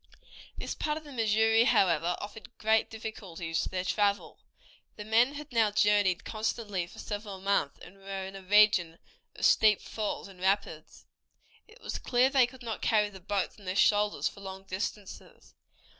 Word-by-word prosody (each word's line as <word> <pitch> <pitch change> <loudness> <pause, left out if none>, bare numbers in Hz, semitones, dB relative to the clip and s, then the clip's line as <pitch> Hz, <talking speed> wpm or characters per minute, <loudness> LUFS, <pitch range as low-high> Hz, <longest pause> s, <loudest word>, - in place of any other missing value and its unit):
This - - -4
part 300 0 -2
of 315 - -8
the 295 - -12
Missouri, 225 -1 +3
however, 175 - +2
offered 215 +3 -10
great 220 0 +2
difficulties 190 -7 -5
to - - -3
their 185 -1 -3
travel. 205 0 0 0.6
The 210 - -8
men 235 +6 +3
had 295 0 -8
now 225 -3 +3
journeyed 205 -3 +2
constantly 215 -4 -3
for - - -16
several 205 -2 -6
months, 195 -7 0
and 185 +3 -14
were 195 -1 -6
in 190 +1 -9
a 195 - -8
region 190 -4 +4 0.4
of - - -1
steep 215 -2 +5
falls 215 -2 -4
and 190 -2 -15
rapids. 190 -5 -2 0.6
It 450 +3 -19
was - - -5
clear 255 +1 +2
that 270 - +2
they 245 - +6
could 255 0 -14
not 225 -2 -5
carry 210 -2 +2
the 190 - -11
boats 200 +2 -3
on 200 - -15
their 185 +1 -3
shoulders 205 +1 +3
for 200 - -8
long 190 0 -8
distances. 195 +1 -7
205 Hz, 175 wpm, -29 LUFS, 190-220 Hz, 0.6 s, they